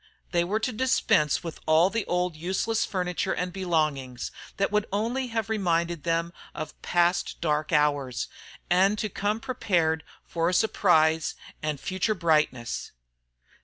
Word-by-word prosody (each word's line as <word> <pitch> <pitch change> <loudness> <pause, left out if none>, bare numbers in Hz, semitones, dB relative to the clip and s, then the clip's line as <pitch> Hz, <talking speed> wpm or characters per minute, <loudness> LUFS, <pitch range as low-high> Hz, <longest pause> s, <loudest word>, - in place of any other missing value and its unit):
They 170 -1 +2
were 200 +5 0
to 250 - 0
dispense 215 - +2
with 165 -2 -6
all 160 +4 +5
the 225 -1 -1
old 180 -1 0
useless 190 +7 0
furniture 180 0 -1
and 180 0 -3
belongings, 155 -9 -1 0.3
that 195 - +1
would 210 0 +1
only 235 +6 -1
have 225 -2 -2
reminded 170 -7 0
them 170 0 0 0.2
of 155 0 -7
past 175 +1 +1
dark 155 -2 0
hours, 145 -5 +1 0.4
and 195 +4 +3
to 215 - -2
come 205 +3 -1
prepared 170 -10 0 0.2
for 165 -1 0
a 180 - 0
surprise 160 -7 +3 0.3
and 150 -2 -2
future 190 +6 -1
brightness. 155 - 0
175 Hz, 140 wpm, -27 LUFS, 155-200 Hz, 0.4 s, all